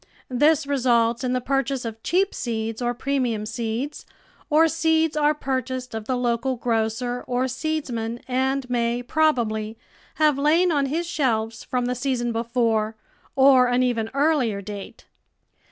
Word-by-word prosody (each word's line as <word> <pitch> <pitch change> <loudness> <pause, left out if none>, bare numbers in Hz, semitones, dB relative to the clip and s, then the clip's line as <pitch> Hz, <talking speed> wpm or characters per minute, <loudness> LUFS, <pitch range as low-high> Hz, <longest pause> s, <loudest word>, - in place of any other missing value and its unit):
This 295 +3 +3
results 240 -3 +2
in 250 0 0
the 255 - +1
purchase 270 -1 -1
of 225 -1 -6
cheap 380 - +1
seeds 225 -1 -3
or 240 0 -1
premium 245 -5 -1
seeds, 235 +6 -4 0.5
or 320 +2 +5
seeds 320 -1 +1
are 300 0 +3
purchased 260 -3 -3
of 220 -1 -5
the 255 +2 -1
local 245 +1 0
grocer 235 +1 -1
or 250 +1 0
seedsman 255 -5 -3
and 265 +1 0
may, 240 0 0
probably, 230 -7 0 0.4
have 300 -3 +3
lain 330 +5 +3
on 285 -3 +1
his 325 +5 -1
shelves 230 -8 -1
from 250 -1 -1
the 250 - 0
season 250 -2 -1
before 225 -2 0 0.4
or 265 -2 +6
an 245 +1 +2
even 230 -3 0
earlier 280 -8 +2
date. 200 0 -9
250 Hz, 145 wpm, -23 LUFS, 230-280 Hz, 0.5 s, or